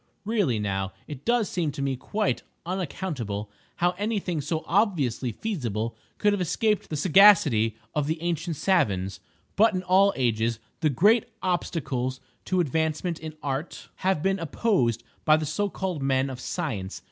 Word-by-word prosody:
Really 200 - +1
now 95 -2 -2
it 145 -3 -8
does 235 -3 +2
seem 165 -5 -1
to - - -5
me 135 -1 0
quite 210 - -1 0.2
unaccountable 145 - -3 0.2
how 175 0 +2
any 215 +2 0
thing 175 -5 -2
so 155 +3 -2
obviously 160 - +1
feasible 115 - -3 0.2
could 205 -1 +3
have 200 - -1
escaped 210 +4 0
the 155 - -3
sagacity 150 - +5 0.2
of 150 -2 0
the 160 +1 -1
ancient 170 -1 -1
savans. 100 - +1 0.4
But 215 0 +4
in 185 - -2
all 190 +2 +5
ages 115 -2 +1 0.2
the 155 - +2
great 205 - +4 0.2
obstacles 130 -8 -1 0.3
to 185 - +1
advancement 160 +2 -1
in 155 -1 -7
Art 140 +3 -4
have 185 -4 0
been 195 0 +1
opposed 150 - +1 0.2
by 155 0 +5
the 155 - -2
so 200 +8 -1
called 185 -6 -3
men 135 0 +1
of 125 - -7
science. 125 - -4
160 Hz, 160 wpm, -26 LUFS, 125-190 Hz, 0.4 s, sagacity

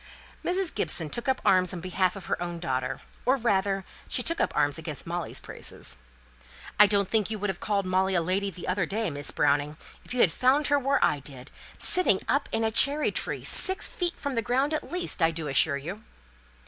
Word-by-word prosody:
Mrs. 365 0 -1
Gibson 160 -4 0
took 240 +3 -4
up 260 - +1
arms 185 -2 +4
on - - -5
behalf 185 +1 0
of 195 - -8
her - - -2
own 175 -1 -4
daughter, 130 -6 -3 0.2
or, 255 +2 +3
rather, 195 -5 0 0.2
she 250 - 0
took 335 +5 0
up - - +1
arms 145 +1 +2
against 155 -3 -6
Molly's 170 0 -3
praises. 60 - -4 0.8
"I 210 - +9
don't 200 -1 +2
think 215 -1 +1
you 220 - -3
would 205 -1 -1
have 180 - -11
called 200 -2 -1
Molly 190 +1 +1
a 175 - +3
lady 195 +4 0
the 180 -2 -9
other 185 0 0
day, 215 -3 -2
Miss 145 0 -1
Browning, 145 +1 +1 0.3
if - - -14
you 245 - +2
had 170 - +5
found 275 - +2
her 285 0 +4
where 275 +1 +2
I 145 - 0
did: 135 -1 -10 0.3
sitting 350 - +3
up 280 +1 0
in 225 - 0
a 220 - +1
cherry 285 +6 +4
tree, - - -2
six 380 0 +2
feet 350 -1 -2
from 280 - -4
the 230 - 0
ground 265 +7 0
at 310 - -3
least, 355 - -3
I 165 - +5
do 160 -2 -4
assure 140 +1 +3
you." 175 +10 -7
195 Hz, 215 wpm, -27 LUFS, 165-250 Hz, 0.8 s, I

